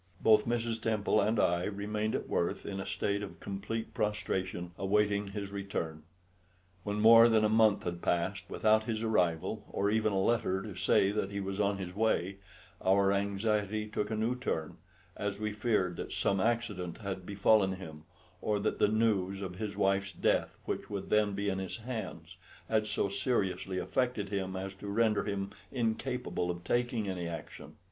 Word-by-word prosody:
Both 110 -1 +5
Mrs. 115 -1 -1
Temple 110 -1 +2
and 110 +2 +1
I 85 -1 +2
remained 105 +1 -2
at - - -3
Worth 85 - -1
in 100 -1 -4
a 95 - -5
state 100 +1 -1
of 100 - -7
complete 105 +3 -4
prostration, 95 -4 -2
awaiting 100 +1 +1
his 100 0 -5
return. 95 -6 -4 0.8
When 105 +2 -2
more 115 +2 +8
than 110 -1 +4
a - - +3
month 110 -2 +4
had 85 -1 -4
passed 95 +3 0
without 110 0 +3
his 110 -1 -2
arrival, 105 -1 +1
or 100 +1 0
even 110 0 +2
a 95 - +1
letter 95 -2 +1
to 105 - -6
say 95 +1 +3
that 105 -2 -1
he 100 0 -4
was 95 0 -4
on 100 -1 +2
his 90 -2 -6
way, 100 -3 +1 0.5
our 95 +1 +4
anxiety 105 +1 0
took 105 -1 -2
a 110 - -1
new 110 +3 0
turn, 80 -11 -3 0.4
as 100 -1 -3
we 105 0 -2
feared 105 -5 0
that - - -5
some 100 - +1
accident 105 -7 -1
had 95 -2 -4
befallen 100 0 +3
him, 80 -4 -9 0.4
or 105 -1 0
that - - -1
the - - +5
news 100 -3 +1
of 90 -1 -6
his 105 0 -4
wife's 100 0 +1
death, - - +1
which - - -3
would 100 -2 -5
then 105 -1 +3
be 100 +1 -2
in 95 -1 0
his 95 -1 -4
hands, 95 -8 -6 0.3
had 110 -1 +1
so - - 0
seriously 100 -2 -1
affected 125 -1 -1
him 95 -2 -2
as 95 +1 -4
to 100 +1 -9
render 110 +1 +2
him 100 -1 -2 0.2
incapable 115 -5 -1
of 85 0 -4
taking 120 -1 0
any 90 -3 -3
action. 85 -2 -8
100 Hz, 180 wpm, -32 LUFS, 95-110 Hz, 0.8 s, more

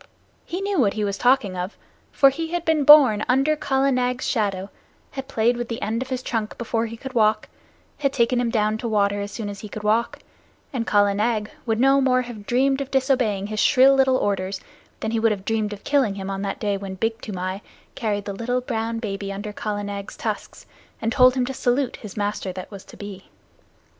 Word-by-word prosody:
He 360 +3 -4
knew 395 -3 0
what 205 -6 +2
he 215 - -1
was 200 -1 -1
talking 245 -5 +2
of; 180 +3 -5 0.3
for 275 -1 +5
he 325 +4 -4
had 345 0 -3
been 320 -2 +2
born 265 -8 +8
under 270 +4 +3
Kala 275 -2 +1
Nag's 250 0 0
shadow, 200 -4 -1 0.4
had 270 -1 -6
played 235 -2 +2
with 240 -1 -3
the 230 - -3
end 220 +3 -2
of 260 - -5
his 255 -1 -3
trunk 220 -2 -3
before 230 -1 -1
he 230 +1 -8
could 265 +2 -8
walk, 215 -2 +2 0.5
had 275 -2 +1
taken 245 -1 +2
him 240 - 0
down 215 -1 0
to 235 - -3
water 205 -2 +1
as 200 0 -5
soon 220 -3 -5
as 200 -1 -6
he 210 - -8
could 210 +1 -7
walk, 220 +3 +1 0.6
and 235 -3 -2
Kala 205 -1 +3
Nag 215 +1 -1 0.2
would 225 -1 +1
no 270 +2 +5
more 255 -1 +3
have 225 -4 -10
dreamed 270 +2 +2
of 275 - -5
disobeying 255 -8 +1
his 215 +1 -4
shrill 270 +2 +6
little 265 -1 +4
orders 195 -3 -1 0.4
than 220 - -2
he 225 - 0
would 225 0 +3
have 200 -2 -4
dreamed 220 -2 0
of 205 -1 -8
killing 270 -8 +2
him 195 0 -5
on 195 0 -3
that 200 -1 -3
day 205 -2 0
when 195 -1 -6
Big 225 +3 -2
Toomai 185 -1 -4 0.3
carried 205 -3 -2
the 200 - -4
little 245 +5 -1
brown 230 -2 -2
baby 200 -3 -4
under 205 +1 -6
Kala 205 0 -3
Nag's 200 0 -6
tusks, - - -5 0.3
and 225 - -1
told 255 -1 +5
him 255 -1 +1
to 265 - -4
salute 250 +1 0
his 210 -3 -10
master 205 -2 -2
that 185 +2 -8
was 195 -2 -9
to - - -14
be. 200 -2 -9
225 Hz, 220 wpm, -23 LUFS, 205-255 Hz, 0.6 s, born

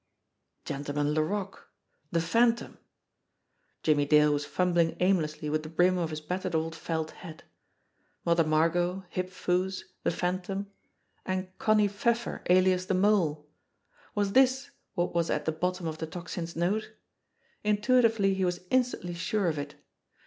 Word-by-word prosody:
Gentleman 145 +1 -2
Laroque! 190 +6 -2 0.4
The 165 - +2
Phantom! 230 +7 +1 1.0
Jimmie 145 -2 +3
Dale 150 0 +5
was 145 0 -2
fumbling 175 -2 +1
aimlessly 165 -5 +1
with 155 +1 0
the 155 - -8
brim 180 +3 +3
of 165 -2 -1
his 155 -1 -5
battered 180 +2 -3
old 160 0 -1
felt 160 -1 -3
hat. 160 -5 -11 0.8
Mother 170 0 +4
Margot, 175 +4 +1
Hip 185 0 -2
Foo's, 185 +1 -1 0.2
the - - +1
Phantom 185 +2 -2 0.6
and 185 0 -3
Connie 215 -1 +4
THE 205 - -2
MESSAGE 200 - -16
81 235 -1 +5
Pfeffer, 235 - -6
alias 185 0 +4
the 190 - +1
Mole! 180 -7 +2 0.7
Was 205 -1 +1
this 265 +1 +3 0.2
what 175 -2 0
was 170 -1 +1
at 150 - -1
the 160 - +1
bottom 180 +3 -2
of 160 -1 -4
the 160 - -3
Tocsin's 170 0 -6
note? 190 +6 -1 0.7
Intuitively 210 -1 +3
he 190 0 -1
was 180 -1 -1
instantly 245 -9 +1
sure 195 +4 -1
of 155 -2 -2
it. 145 0 -6
180 Hz, 150 wpm, -29 LUFS, 160-195 Hz, 1.0 s, Dale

